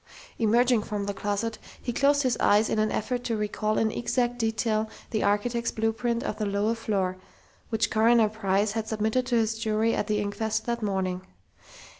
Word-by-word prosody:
Emerging 235 Hz, +1 st, +3 dB
from 210 Hz, -1 st, -4 dB
the 200 Hz, -, -2 dB
closet 205 Hz, +3 st, -2 dB, 0.2 s
he 240 Hz, -, -4 dB
closed 285 Hz, +3 st, +3 dB
his 255 Hz, -2 st, +2 dB
eyes 210 Hz, +2 st, +4 dB
in -, -, +1 dB
an 215 Hz, 0 st, +1 dB
effort 245 Hz, +3 st, -2 dB
to 230 Hz, -2 st, -1 dB
recall 215 Hz, 0 st, -1 dB
in 220 Hz, -1 st, +2 dB
exact 245 Hz, +1 st, -1 dB
detail 220 Hz, -1 st, 0 dB, 0.2 s
the 215 Hz, -, 0 dB
architect's 230 Hz, +4 st, +1 dB
blueprint 225 Hz, +2 st, -1 dB
of 215 Hz, -, -4 dB
the 215 Hz, -, 0 dB
lower 200 Hz, +3 st, +1 dB
floor, 195 Hz, -5 st, -1 dB, 0.5 s
which 225 Hz, 0 st, 0 dB
Coroner 225 Hz, 0 st, +4 dB
Price 205 Hz, -1 st, 0 dB
had 220 Hz, 0 st, -3 dB
submitted 220 Hz, +3 st, 0 dB
to 245 Hz, -, +1 dB
his 225 Hz, -1 st, +1 dB
jury 220 Hz, 0 st, +1 dB
at -, -, -1 dB
the 210 Hz, -1 st, +1 dB
inquest 205 Hz, +2 st, -2 dB
that 235 Hz, 0 st, -2 dB
morning. 190 Hz, -3 st, -1 dB
220 Hz, 180 wpm, -27 LUFS, 210-235 Hz, 0.5 s, eyes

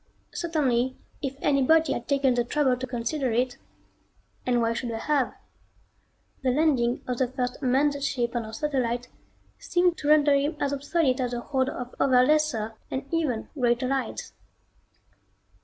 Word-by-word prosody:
Certainly 260 Hz, -7 st, 0 dB, 0.2 s
if 275 Hz, -1 st, -3 dB
anybody 295 Hz, +3 st, +4 dB
had 235 Hz, -, -5 dB
taken 275 Hz, -2 st, +2 dB
the 240 Hz, 0 st, +1 dB
trouble 265 Hz, +1 st, +1 dB
to 260 Hz, +1 st, -5 dB
consider 245 Hz, +2 st, -2 dB
it 245 Hz, +2 st, 0 dB, 0.9 s
and 245 Hz, -1 st, +3 dB
why 230 Hz, 0 st, +1 dB
should 235 Hz, +1 st, -4 dB
they 225 Hz, -, -3 dB
have? 275 Hz, +2 st, 0 dB, 1.1 s
the 265 Hz, -, +1 dB
landing 255 Hz, -4 st, +2 dB
of 250 Hz, -1 st, -3 dB
the 260 Hz, -, +2 dB
first 250 Hz, +1 st, -3 dB
manned 280 Hz, +2 st, +2 dB
ship 245 Hz, -4 st, -1 dB
on 235 Hz, -, 0 dB
our 220 Hz, -, -8 dB
satellite 245 Hz, -1 st, -2 dB, 0.5 s
seemed 350 Hz, -1 st, +1 dB
to 290 Hz, -, -4 dB
render 295 Hz, -1 st, +5 dB
him 285 Hz, +3 st, +1 dB
as 285 Hz, 0 st, 0 dB
obsolete 280 Hz, -1 st, +1 dB
as 245 Hz, -1 st, -2 dB
a 240 Hz, -, -3 dB
horde 265 Hz, 0 st, 0 dB
of 250 Hz, -2 st, -6 dB
other 255 Hz, -2 st, +5 dB
lesser 290 Hz, -8 st, +1 dB, 0.2 s
and 265 Hz, -, -3 dB
even 290 Hz, -9 st, -1 dB
greater 245 Hz, -1 st, +1 dB
lights. 270 Hz, 0 st, -3 dB
260 Hz, 155 wpm, -26 LUFS, 245-290 Hz, 1.1 s, render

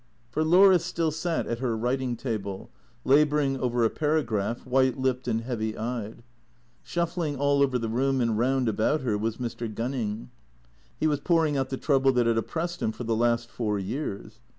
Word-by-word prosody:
For 155 Hz, +6 st, 0 dB
Laura 180 Hz, +3 st, +6 dB
still 165 Hz, -1 st, -1 dB
sat 165 Hz, +2 st, -2 dB
at 115 Hz, -, -3 dB
her 120 Hz, -3 st, -1 dB
writing 125 Hz, +2 st, -1 dB
table, 105 Hz, -5 st, -5 dB, 0.3 s
labouring 145 Hz, -1 st, +3 dB
over 120 Hz, -2 st, 0 dB
a -, -, +3 dB
para 155 Hz, 0 st, +1 dB
graph, 110 Hz, +1 st, -2 dB
white 130 Hz, 0 st, +2 dB
lipped 130 Hz, -1 st, -1 dB
and 115 Hz, -1 st, 0 dB
heavy 110 Hz, -3 st, -3 dB
eyed. 115 Hz, -1 st, -4 dB, 0.6 s
Shuffling 170 Hz, -3 st, -2 dB
all 140 Hz, +1 st, +2 dB
over 135 Hz, -2 st, +3 dB
the 115 Hz, -2 st, -3 dB
room 130 Hz, +4 st, +1 dB
and 115 Hz, -3 st, +1 dB
round 130 Hz, +2 st, +1 dB
about 110 Hz, +7 st, +1 dB
her 120 Hz, -5 st, 0 dB
was 110 Hz, +2 st, -2 dB
Mr. 120 Hz, -2 st, -4 dB
Gunning. 115 Hz, -1 st, -3 dB, 0.7 s
He -, -, 0 dB
was 150 Hz, -2 st, +2 dB
pouring 160 Hz, -1 st, +2 dB
out 135 Hz, -1 st, -1 dB
the 130 Hz, -, -3 dB
trouble 135 Hz, -2 st, +3 dB
that 120 Hz, -1 st, +2 dB
had 115 Hz, -1 st, +2 dB
oppressed 170 Hz, +8 st, -4 dB
him 110 Hz, -, +1 dB
for 125 Hz, -, -7 dB
the 115 Hz, -1 st, 0 dB
last 120 Hz, 0 st, +1 dB
four 105 Hz, -3 st, -1 dB
years. 105 Hz, +1 st, -5 dB
125 Hz, 185 wpm, -27 LUFS, 115-145 Hz, 0.7 s, Laura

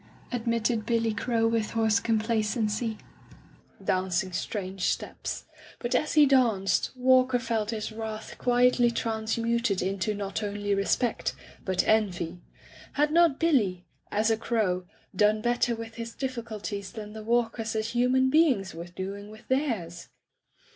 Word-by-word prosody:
'' -, -, -26 dB
admitted 230 Hz, -1 st, 0 dB
Billy 230 Hz, 0 st, +1 dB
Crow 230 Hz, +1 st, +1 dB
with 225 Hz, -2 st, 0 dB
hoarse 225 Hz, -1 st, +3 dB
complacency, 220 Hz, 0 st, 0 dB, 0.9 s
dancing 185 Hz, 0 st, 0 dB
strange 190 Hz, -1 st, -3 dB
steps; -, -, -3 dB, 0.3 s
but 240 Hz, -, -3 dB
as 305 Hz, -, +1 dB
he 300 Hz, -1 st, +8 dB
danced, 235 Hz, -8 st, +3 dB
Walker 255 Hz, 0 st, +4 dB
felt 230 Hz, -3 st, -1 dB
his 220 Hz, -1 st, -3 dB
wrath 220 Hz, 0 st, -6 dB
quietly 245 Hz, 0 st, +4 dB
transmuted 230 Hz, -1 st, 0 dB
into 195 Hz, +2 st, -1 dB
not 200 Hz, +1 st, -3 dB
only 205 Hz, -1 st, -2 dB
respect, 200 Hz, +4 st, 0 dB, 0.3 s
but 185 Hz, -1 st, 0 dB
envy. 180 Hz, -5 st, +1 dB, 0.5 s
Had 295 Hz, +1 st, +2 dB
not 330 Hz, -4 st, +4 dB
Billy— 210 Hz, -, +2 dB, 0.3 s
as 215 Hz, +2 st, +2 dB
a 220 Hz, -, +2 dB
fcrow— 200 Hz, -6 st, 0 dB, 0.3 s
done 210 Hz, +2 st, +4 dB
better 240 Hz, +1 st, +1 dB
with 225 Hz, 0 st, -8 dB
his 230 Hz, 0 st, -6 dB
difficulties 220 Hz, -6 st, -4 dB
than 210 Hz, -2 st, -7 dB
the 220 Hz, -, -7 dB
Walkers 225 Hz, -1 st, 0 dB
as 220 Hz, 0 st, -1 dB
human 250 Hz, +2 st, +2 dB
beings 265 Hz, -, +3 dB
were 165 Hz, +1 st, -7 dB
doing 195 Hz, +3 st, -6 dB
with 215 Hz, +2 st, -14 dB
theirs? 225 Hz, -, -1 dB
225 Hz, 135 wpm, -28 LUFS, 205-240 Hz, 0.9 s, he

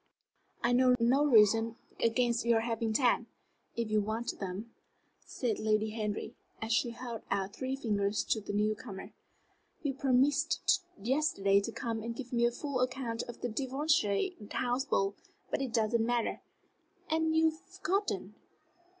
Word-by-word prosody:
"I 240 Hz, -, +3 dB
know 250 Hz, 0 st, +5 dB
no 250 Hz, +5 st, +4 dB
reason 225 Hz, -1 st, +5 dB, 0.3 s
against 235 Hz, +1 st, +2 dB
your 230 Hz, -1 st, +3 dB
having 230 Hz, -1 st, -1 dB
ten, 235 Hz, 0 st, +2 dB, 0.5 s
if 230 Hz, -2 st, -2 dB
you 215 Hz, 0 st, +3 dB
want 220 Hz, +3 st, -3 dB
them," 200 Hz, +4 st, -5 dB, 0.5 s
said 235 Hz, -5 st, -2 dB
Lady 215 Hz, 0 st, +1 dB
Henry, 215 Hz, -2 st, -3 dB, 0.3 s
as 220 Hz, 0 st, -1 dB
she 240 Hz, -, +2 dB
held 235 Hz, -1 st, -6 dB
out 195 Hz, 0 st, -1 dB
three 260 Hz, +1 st, -2 dB
fingers 210 Hz, -5 st, 0 dB
to 220 Hz, -, +2 dB
the 205 Hz, -, -5 dB
new 210 Hz, +1 st, +2 dB
comer. 210 Hz, -3 st, -9 dB, 0.7 s
"You 285 Hz, -2 st, 0 dB
promised 280 Hz, +8 st, +2 dB, 0.2 s
yesterday 205 Hz, -5 st, +2 dB
to 230 Hz, -, -4 dB
come 225 Hz, -1 st, -3 dB
and 230 Hz, +1 st, -4 dB
give 250 Hz, 0 st, -7 dB
me 235 Hz, 0 st, +4 dB
a -, -, 0 dB
full 280 Hz, +1 st, -3 dB
account 245 Hz, -3 st, -1 dB
of 240 Hz, -, -9 dB
the -, -, -1 dB
Devonshire 265 Hz, -, +1 dB, 0.2 s
House 250 Hz, +2 st, 0 dB
ball. 195 Hz, -7 st, +1 dB, 0.4 s
But -, -, 0 dB
it 265 Hz, -3 st, -2 dB
doesn't 225 Hz, 0 st, +2 dB
matter 235 Hz, 0 st, 0 dB, 0.7 s
and 320 Hz, 0 st, +1 dB
you 320 Hz, 0 st, +5 dB
have 315 Hz, -, -15 dB
forgotten." 380 Hz, +2 st, -2 dB
235 Hz, 155 wpm, -32 LUFS, 215-265 Hz, 0.7 s, know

